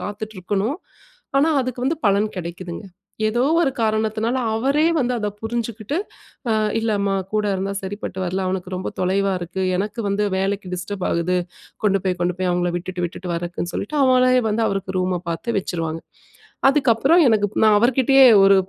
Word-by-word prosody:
காத்துட்டு 215 +1 -6
இருக்கணும். 205 - -1 0.6
ஆனா, 295 +4 +4
அதுக்கு 250 -1 -4
வந்து 310 +4 +1
பலன் 200 +1 +3
கிடைக்குதுங்க. 175 +2 -6 0.4
ஏதோ 240 +3 0 0.2
ஒரு 275 - +2
காரணத்துனால, 220 +2 0 0.2
அவரே 275 +7 +2
வந்து 250 -2 +1
அத 210 -2 -1
புரிஞ்சுகிட்டு 230 +3 -3 0.5
அ - - +3 0.3
இல்லம்மா! 200 -3 0 0.2
கூட 215 0 +1
இருந்தா 195 +1 -2
சரிப்பட்டு 190 -1 -6
வரல. 185 +2 -2
அவனுக்கு 185 0 -3
ரொம்ப 185 - -4
தொலைவா 195 +2 +1
இருக்கு. 180 +2 -4 0.2
எனக்கு 210 +4 -3
வந்து 200 +1 0 0.2
வேலைக்கு 195 -1 -2
டிஸ்டர்ப் 185 +1 -5
ஆகுது. 170 +2 0 0.5
கொண்டு 195 -1 +3
போய், 185 -1 0
கொண்டு 175 0 0
போய் 185 -1 0
அவுங்கள 175 0 0
விட்டுட்டு, 180 0 -4
விட்டுட்டு 180 +1 -7
வரக்குன்னு 175 +1 -4
சொல்லிட்டு, 295 +9 -3
அவுங்களே 255 -1 +4
வந்து 225 +2 +1
அவருக்கு 190 -1 -3
ரூம 180 -1 -1
பாத்து 200 +8 -3
வச்சிருவாங்க. 165 -3 -3 0.7
அதுக்கு 275 -2 +3
அப்பறம் 300 +10 +4
எனக்கு 215 -3 +3 0.2
நான் 215 -1 +6
அவருக்கிட்டயே 265 +3 +4 0.2
ஒரு, 195 0 +7
200 Hz, 160 wpm, -21 LUFS, 185-230 Hz, 0.7 s, ஒரு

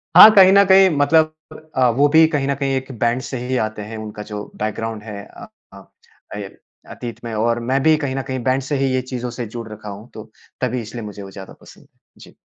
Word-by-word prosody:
हाँ, 195 +5 +12
कहीं 190 -1 +8
न 200 0 +7
कहीं 190 0 +7
मतलब 155 +2 +3 0.4
अ, 130 -1 +3
वो 145 +1 +5
भी 160 0 +8
कहीं 150 -4 -1
न 140 - 0
कहीं 135 -1 -1
एक 130 +1 -4
बैंड 120 +2 +1
से 130 - -4
ही 130 0 -1
आते 110 -1 -9
हैं, 110 +2 -8
उनका 105 -1 -8
जो 105 0 -5
बैकग्राउंड 110 0 -4
है 105 -2 -8
अ - - -13 0.3
अ, 100 0 -13 0.5
अय 100 -2 -6 0.4
अतीत 120 -1 -8
में 115 -1 -6
और 115 +2 0
मैं 135 +1 +1
भी 160 0 +5
कहीं 140 -3 -3
न 135 - -1
कहीं 130 0 -3
बैंड 130 +1 +1
से 145 +3 -3
ही 135 -1 0
ये 130 - +1
चीज़ों 125 -1 -4
से 120 - -2
जुड़ 115 -1 -6
रखा 105 0 -9
हूँ 105 +4 -10
तो 110 0 -10 0.3
तभी 125 -1 -1
इसलिए 115 +1 -8
मुझे 105 -1 -8
वो 95 - -10
ज़्यादा 95 -1 -11
पसंद - - -16
है। - - -33 0.2
जी। - - -15
125 Hz, 240 wpm, -20 LUFS, 110-140 Hz, 0.5 s, हाँ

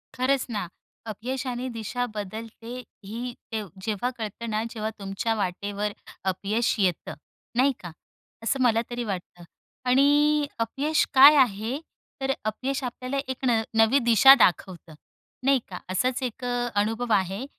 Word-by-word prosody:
खरंच 260 +1 +1
ना. 205 -6 -3 0.4
अपयशाने 250 +3 -4
दिशा 230 +3 -2
बदलते 225 +3 -7 0.3
ही 215 +4 -6 0.3
ते 220 -1 -2 0.2
जेव्हा 215 +3 -1
कळतं 225 +1 -5
ना, 215 0 -1
जेव्हा 220 -2 -3
तुमच्या 195 +3 -2
वाटेवर 205 +1 -2 0.4
अपयश 210 +5 0
येतं, 185 -4 0 0.4
नाही 270 +3 +5
का? 175 - -8 0.5
असं 260 +4 0
मला 230 -2 +4
तरी 240 0 -3
वाटतं 180 -4 -6 0.5
आणि 290 +3 +4
अपयश 275 +7 +1
काय 280 +3 +9
आहे? 240 0 +2 0.4
तर 270 0 +1
अपयश 260 +6 -2
आपल्याला 255 +2 -4
एक 260 0 -4
न 235 -3 +3 0.2
नवी 225 +5 +5
दिशा 235 +4 +9
दाखवतं, 175 -4 +1 0.5
नाही 275 -1 +4
का? 180 - -7
असाच 250 +8 0
एक 250 0 -5
अ, 245 0 -1
अनुभव 225 +3 -2
आहे, 195 +5 0
230 Hz, 135 wpm, -26 LUFS, 205-260 Hz, 0.5 s, काय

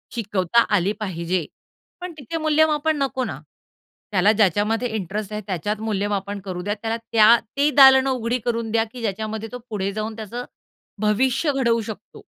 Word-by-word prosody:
शिकवता 205 -1 +1
आली 195 +1 +1
पाहिजे. 175 -4 -2 0.6
पण 360 0 -5
तिथे 295 +3 -5
मूल्यमापन 310 0 +2
नको 260 -1 -2
ना. - - -5 0.7
त्याला 200 +1 +4
ज्याच्यामध्ये 215 +3 +1
इंटरेस्ट 205 +1 -4
आहे 210 - -3
त्याच्यात 205 +3 -2
मूल्यमापन 205 -1 -2
करू 180 -2 -4
द्या. 205 +3 -2
त्याला 225 0 -2
त्या 225 0 +7 0.2
ती 285 +1 +3
दालनं 265 -1 +7
उघडी 245 -1 -1
करून 230 -2 -1
द्या 225 0 +2
की 245 - -9
ज्याच्यामध्ये 220 +1 -3
तो 250 - -5
पुढे 200 -3 -2
जाऊन 215 +1 -4
त्याचं 230 +3 -6 0.6
भविष्य 255 +8 +2
घडवू 235 -4 +2
शकतो. 220 -1 -9
220 Hz, 155 wpm, -22 LUFS, 205-245 Hz, 0.7 s, त्या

